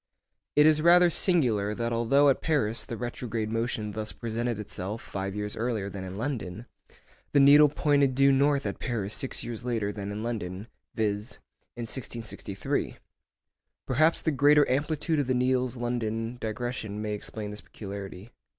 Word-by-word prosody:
It 150 - +6
is 155 -1 +5
rather 175 +1 +6
singular 115 - +2
that 115 +1 -2
although 135 +5 +4
at 135 - +1
Paris 125 -9 0
the 115 - -6
retrograde 115 -2 -4
motion 115 -2 -2
thus 110 +1 -4
presented 115 0 -3
itself 105 0 -5
five 95 -1 -5
years 105 0 -3
earlier 110 -4 -2
than 95 -1 -6
in 95 0 -7
London, 115 -3 -4 0.7
the 145 - +5
needle 145 +2 +8
pointed 140 -2 +2
due 140 +1 +5
north 140 +1 +2
at - - -3
Paris 110 -5 -2
six 135 - 0
years 120 0 -6
later 115 -5 -1
than 100 -1 -5
in 105 +2 -5
London, 105 -4 -4 0.3
viz., 105 +1 -1 0.4
in 120 - -5
1663. 115 -5 -3 0.9
Perhaps 155 +6 +2
the 160 - +2
greater 145 +1 +5
amplitude 150 +4 0
of 140 - 0
the 130 - +1
needle's 125 0 +1
London 120 0 -3
digression 110 -2 -4
may 105 0 -3
explain 105 0 -6
this 105 - -6
peculiarity. 100 +1 -8
115 Hz, 160 wpm, -28 LUFS, 105-135 Hz, 0.9 s, needle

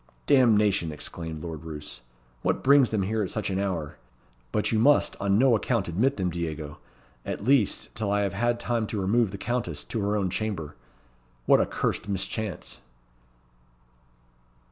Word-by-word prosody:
"Damnation!" 105 - +4
exclaimed 80 +1 -6
Lord 80 -3 -6
Roos. 75 -5 -8 0.4
"What - - 0
brings 140 -2 +6
them 105 -3 0
here 110 +3 -1
at 95 - -2
such 110 -2 -3
an 95 - -1
hour? 90 -7 -3 0.5
But 105 - 0
you 110 - +2
must 145 +5 +4
on 100 0 +2
no 130 0 +5
account 110 - 0
admit 115 +12 +1
them, 90 -3 -1
Diego 80 -3 -5 0.4
at - - -5
least, 125 -3 +2
till 110 -3 -2
I 105 0 +2
have 100 -3 -1
had 120 +4 0
time 120 -2 -1
to 105 - -3
remove 105 +3 +2
the 100 - -7
Countess 95 -10 -2
to 110 - -4
her 100 +1 0
own 95 -3 -1
chamber. 100 -9 -3 0.7
What - - +5
a - - 0
cursed - - -2
mischance!" 100 +1 -3
100 Hz, 165 wpm, -26 LUFS, 85-115 Hz, 0.7 s, brings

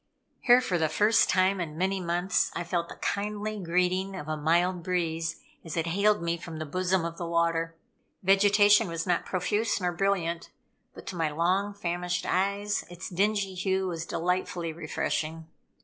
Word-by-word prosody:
Here, 245 +1 +6
for 180 -8 -1
the 160 -1 +1
first 210 +7 +3
time 185 0 +2
in 155 -2 -5
many 190 +2 0
months, 175 +1 0
I 170 - -2
felt 170 0 -2
the - - -8
kindly 210 +1 -3
greeting 180 +2 0
of 155 -5 -7
a 155 - -1
mild 170 +4 +1
breeze 165 -2 -1 0.3
as 165 0 -6
it 165 - +1
hailed 200 +3 +2
me 170 0 0
from 165 -1 -8
the 155 - -4
bosom 185 +3 0
of 170 0 -5
the 170 - -3
water. 165 0 0 0.5
Vegetation 205 +2 +5
was 165 -1 -3
not 175 -1 0
profuse 205 +5 0
nor 180 -2 0
brilliant, 175 -2 -1 0.5
but - - -11
to 190 - -6
my 165 -2 0
long 185 +6 0
famished 175 -2 -2
eyes, 200 +2 0
its 175 +1 -7
dingy 200 +1 +1
hue 190 +1 0
was 170 -2 -4
delightfully 175 -1 -2
refreshing. 160 0 -3
180 Hz, 170 wpm, -28 LUFS, 170-195 Hz, 0.5 s, Here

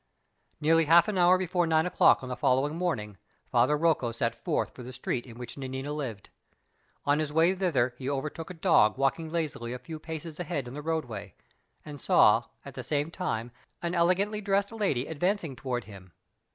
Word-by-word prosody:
Nearly 165 +1 +4
half 170 +4 +6
an 200 -3 -1
hour 180 +1 +6
before 180 -1 0
nine 160 0 +3
o'clock 180 - +4
on 130 - -6
the 125 - -3
following 135 +5 +1
morning, 125 - -2 0.3
Father 150 - +3
Rocco 150 -7 +1
set 115 0 -1
forth 115 - -2
for - - -11
the 125 +1 -8
street 125 0 -3
in 115 -1 -11
which 125 +2 -7
Nanina 135 +2 -4
lived. 125 -9 -6 0.7
On 145 +1 +3
his 155 -1 -2
way 165 +4 +4
thither 155 -11 +1
he 130 0 -3
overtook 150 +4 -4
a 185 - -7
dog 160 - +4
walking 135 +4 0
lazily 150 -8 -3
a - - -4
few 155 +6 -8
paces 160 0 -7
ahead 145 -6 -3
in 120 - -8
the 150 - -6
roadway; 125 - -4 0.5
and 145 -3 -9
saw, - - +5 0.2
at - - -9
the - - -6
same 150 +1 -1
time, 120 -11 -3 0.3
an 170 0 -1
elegantly 185 +5 +2
dressed 200 0 +1
lady 195 - 0
advancing 170 -1 -1
toward 125 -2 -3
him. 95 -2 -13
150 Hz, 190 wpm, -28 LUFS, 125-170 Hz, 0.7 s, half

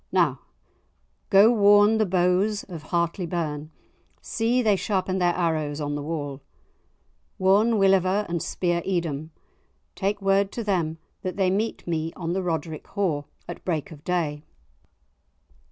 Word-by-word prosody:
Now - - +2 0.9
go, 200 +4 +7
warn 205 0 +5
the 215 - +2
bows 185 +4 +1
of 165 -5 -9
Hartlie 170 +2 -1
Burn, 155 -3 -3 0.5
see 240 +2 0
they 210 -3 +4
sharpen 190 -1 -1
their 175 -1 +2
arrows 155 -4 -1
on 145 -1 -2
the 145 - -3
wall! 145 -3 -4 1.0
Warn 200 +5 +4
Willeva 195 +1 +3
and 170 -1 -2
Speir 175 -1 -1
Edom, 160 -5 -2 0.6
take 205 +1 -1
word 195 0 +2
to 235 - -3
them 170 -6 -1 0.2
that 185 - -4
they 190 -2 +2
meet 215 +4 -2
me 165 -1 -2
on 170 -1 -3
the 190 - -1
Rodric 165 -3 -3
haugh 165 -8 0 0.2
at - - -8
break 160 -5 -2
of 150 -2 -12
day. 160 -5 -1
180 Hz, 140 wpm, -25 LUFS, 160-200 Hz, 1.0 s, go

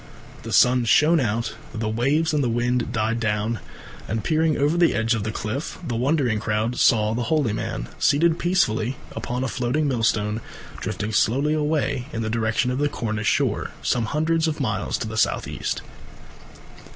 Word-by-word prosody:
The - - -7
sun 125 -1 +4
shone 155 +8 +5
out, 115 -2 -1 0.2
the 110 -1 -2
waves 140 +9 +1
and 150 -2 +2
the 120 - +1
wind 120 +1 0
died 110 +1 0
down, 110 +1 -1 0.5
and, 110 0 -2
peering 160 -1 +2
over 145 +3 +2
the 175 -1 +3
edge 115 +1 +1
of 110 - -1
the 110 - -2
cliff, 110 +7 -4
the 120 - -2
wondering 125 -3 +1
crowd 110 +2 -1
saw 110 -2 +4
the 120 +1 -2
holy 150 -9 +2
man, - - -4
seated 165 +3 +3
peacefully 130 -9 +1 0.2
upon 125 +1 -3
a - - 0
floating 130 +5 0
millstone, 110 -3 0 0.4
drifting 105 +1 -3
slowly 135 +8 +2
away 150 -4 0
in 115 0 -3
the 110 - -2
direction 115 +2 0
of 130 - -2
the 145 0 +1
Cornish 110 -4 -3
shore, - - 0
some 120 -2 +1
hundreds 160 +5 +1
of 155 -1 -2
miles 105 -8 -1
to - - -4
the 110 0 -5
south - - +1
east. - - -3
120 Hz, 175 wpm, -23 LUFS, 110-145 Hz, 0.5 s, shone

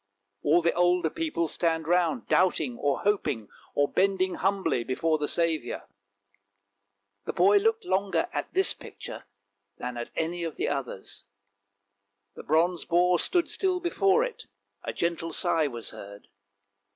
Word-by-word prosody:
" 100 0 -52
All 165 +4 +3
the 170 - +3
older 175 -2 +2
people 310 - -1
stand 160 0 0
round 175 -1 +1
doubting, 155 -8 +2
or 140 -1 0
hoping, 145 - 0 0.3
or 145 - +3
bending 190 +1 +1
humbly 190 -10 0
before 155 +6 0
the 150 - -1
Saviour. 160 -7 -1 1.4
The - - -3
boy 410 +2 +5
looked 445 0 +1
longer 195 - +1
at - - -3
this 380 +1 +3
picture - - -10 0.5
than 125 -1 -5
at 120 - -5
any 170 +2 -2
of 165 -2 -4
the - - -1
others; 135 -9 -5 1.1
the - - -9
bronze 165 +3 +1
boar 175 +1 +3
stood 350 -2 +1
still 370 -2 0
before 390 +5 +2
it, - - -6 0.4
a - - -3
gentle 165 -1 -2
sigh 160 -1 +2
was 120 -4 -5
heard. 100 +1 -11
170 Hz, 145 wpm, -27 LUFS, 145-195 Hz, 1.4 s, boy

